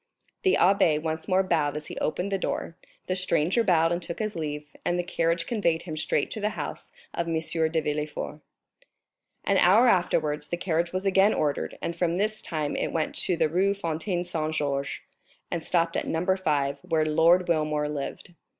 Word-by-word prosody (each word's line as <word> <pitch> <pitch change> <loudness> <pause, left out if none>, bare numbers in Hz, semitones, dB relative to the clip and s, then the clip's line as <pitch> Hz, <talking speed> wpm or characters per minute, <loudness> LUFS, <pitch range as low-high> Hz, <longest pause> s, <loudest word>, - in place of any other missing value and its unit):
The 380 -2 +3
abbé 180 -5 +4
once 160 0 -4
more 190 0 +3
bowed 150 -5 0
as 150 - -6
he - - -8
opened 180 +5 -1
the 195 - 0
door, 165 - -3 0.3
the 185 - -1
stranger 185 +3 +2
bowed 165 -5 +3
and 175 +1 -1
took 170 0 -5
his 215 -1 -3
leave, 150 -2 -5
and 175 - 0
the 175 - 0
carriage 170 -1 0
conveyed 170 -8 0
him 160 -3 -6
straight 155 - 0
to 220 - -4
the 210 - +1
house - - -6 0.2
of 170 - -2
M. 165 -1 0
de 160 0 +1
Villefort. 150 0 -3 1.0
An 195 -1 +2
hour 205 +8 +6
afterwards 155 -7 +1
the 175 - -3
carriage 170 -1 0
was 185 +1 -3
again 195 +2 +4
ordered, 145 -2 -1
and 170 - -1 0.3
this 215 +1 +1
time 155 -3 -3
it - - -1
went 160 -2 -1
to 180 - 0
the 160 -1 +3
Rue 190 +5 +1
Fontaine 175 0 -2
Saint 160 -3 -2
Georges, 140 -2 -2 0.5
and 170 - -1
stopped 170 -1 +1
at - - -1
No. 180 +4 +1
5, 145 -7 0
where 165 -4 0
Lord 165 +4 +4
Wilmore 155 -3 +1
lived. 150 +4 -5
170 Hz, 185 wpm, -27 LUFS, 155-185 Hz, 1.0 s, hour